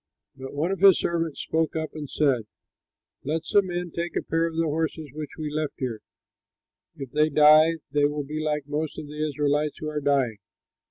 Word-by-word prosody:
'" - - -58
But 135 +1 -8
one 160 +6 0
of 195 - -2
his 195 -1 +7
servants 165 -3 -1
spoke 160 0 -1
up 160 -1 -3
and 150 -3 -7
said, 130 -8 +1 0.8
"Let 160 +3 -2
some 200 +3 +3
men 175 -1 -3
take 170 +1 -4
a - - 0
pair 165 +1 0
of 165 - -6
the 165 - +1
horses 155 -1 -2
which 150 -1 -6
are 155 -2 -4
left 155 -2 -2
here. 120 -4 -3 1.0
If 135 -3 -8
they 155 +1 +3
die, 155 +2 +6 0.2
they 145 +1 +3
will 145 0 -1
be 150 +2 -5
like 150 -2 -1
most 150 +1 -3
of - - -6
the 150 +1 -5
Israelites 150 0 0
who 155 - -4
are 150 -1 -3
dying! 135 -7 +1
150 Hz, 205 wpm, -25 LUFS, 145-160 Hz, 1.0 s, his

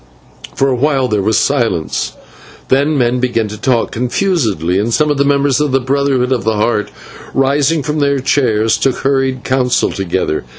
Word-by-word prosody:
For 135 - +1
a 130 - +1
while 135 0 +1
there 105 -4 0
was 110 +3 +1
silence, 115 - -1 0.6
then 145 +3 +2
men 125 -1 +1
began 120 -3 0
to 105 - -7
talk 120 +1 0
confusedly, 115 - 0
and 110 +3 -1
some 150 +5 +2
of 145 - -1
the - - +4
members 140 0 +1
of 150 -2 0
the 135 - +3
Brotherhood 135 -1 0
of 125 -3 0
the 110 0 0
Heart, 105 0 0 0.5
rising 140 +3 +1
from 150 +2 -2
their 140 -1 +1
chairs, 115 -5 +1
took 135 -2 +1
hurried 135 -2 -1
counsel 125 -1 +1
together. 95 -4 -2
130 Hz, 175 wpm, -14 LUFS, 115-140 Hz, 0.6 s, the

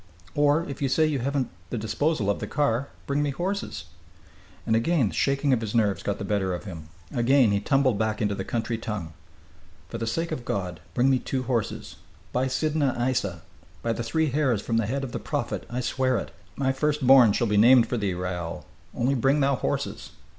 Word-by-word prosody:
Or, 145 +3 +2
if 140 - -7
you 135 - +1
say 155 +4 +3
you 150 -3 0
haven't 135 +1 -1 0.2
the 120 - -3
disposal 115 +3 0
of - - -3
the - - -4
car, 140 -3 0 0.2
bring 140 +1 0
me 145 - 0
horses." 185 +8 -3 0.8
And 110 - +2
again 125 - +2
the - - -9
shaking 140 0 +2
of 120 - +1
his 110 0 -4
nerves 105 -4 +2
got 100 - -2
the 100 - -5
better 95 -3 0
of - - -7
him; 80 -7 -9 0.2
again 125 -1 +4
he 100 - +2
tumbled 130 -1 +2
back 110 -1 0
into 105 -1 0
the 95 - -3
country 115 +1 -2
tongue. 105 -8 -5 0.8
"For - - -5
the 115 - -2
sake 165 +9 -2
of 125 - -3
God, 90 -7 -3 0.2
bring 130 +2 +4
me 130 - +3
two 130 0 -3
horses! 120 -5 -3 0.4
By 130 +1 +1
Sidna 145 0 0
Aissa! 120 - -1 0.4
by 115 - +1
the 115 - -4
Three 155 +5 0
Hairs 135 -6 +1
from 115 - 0
the 115 -3 +1
Head 135 +4 -2
of 130 - -5
the - - -3
Prophet - - -3
I 125 +1 -2
swear 130 +1 +1
it! - - -5 0.2
My 135 -1 +1
first 150 +1 0
born 130 -4 +8
shall 120 - +1
be 105 -2 0
named 120 +2 +7
for 125 - -2
thee, 100 -4 -1
Raoul. 90 -2 -4 0.3
Only 125 +3 +1
bring 135 +3 +2
thou 140 -1 +3
horses! - - -3
125 Hz, 210 wpm, -26 LUFS, 105-140 Hz, 0.8 s, born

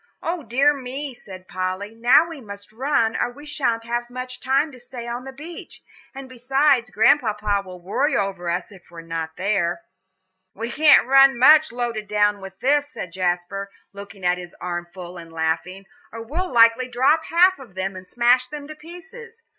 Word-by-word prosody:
"O 340 0 -2
dear 280 +3 +2
me," 270 +1 -6
said 185 -5 -12
Polly, 185 +3 -4
"now 240 +8 +4
we 325 -5 -9
must 200 -2 -11
run, 230 -2 0
or - - 0
we 290 +4 -13
sha'n't 260 -6 -1
have 240 +1 -3
much 255 +1 -7
time 275 +4 +1
to 255 - -14
stay 245 -1 -8
on 240 +2 -5
the 270 - -7
beach; 310 +6 -11 0.3
and 270 0 -8
besides, 260 0 +1
Grandpapa 210 -3 +2
will 185 -1 -11
worry 260 - 0
over 190 -3 -2
us 175 +3 -3
if 190 -3 -17
we're 170 -1 -10
not 165 -1 -5
there." 185 -3 0 0.7
"We 230 +3 -5
can't 300 0 +6
run 270 0 +6
much, 305 +5 +6
loaded 235 -3 -3
down 205 -1 +1
with 190 0 -11
this," 290 +2 +2
said 180 -11 -8
Jasper, 185 +2 -2 0.2
looking 200 -1 -10
at 180 0 +2
his 175 -1 -10
armful 175 0 -6
and 165 -1 -12
laughing, 165 +4 -3 0.3
"or 230 0 -7
we'd 330 +11 -3
likely 230 +1 +5
drop 270 +6 +2
half 360 +1 +4
of 235 -9 -14
them, 190 0 -3
and 185 0 -10
smash 245 +3 +3
them 290 +1 -8
to 310 - -8
pieces. 390 +9 -13
235 Hz, 180 wpm, -22 LUFS, 190-275 Hz, 0.7 s, can't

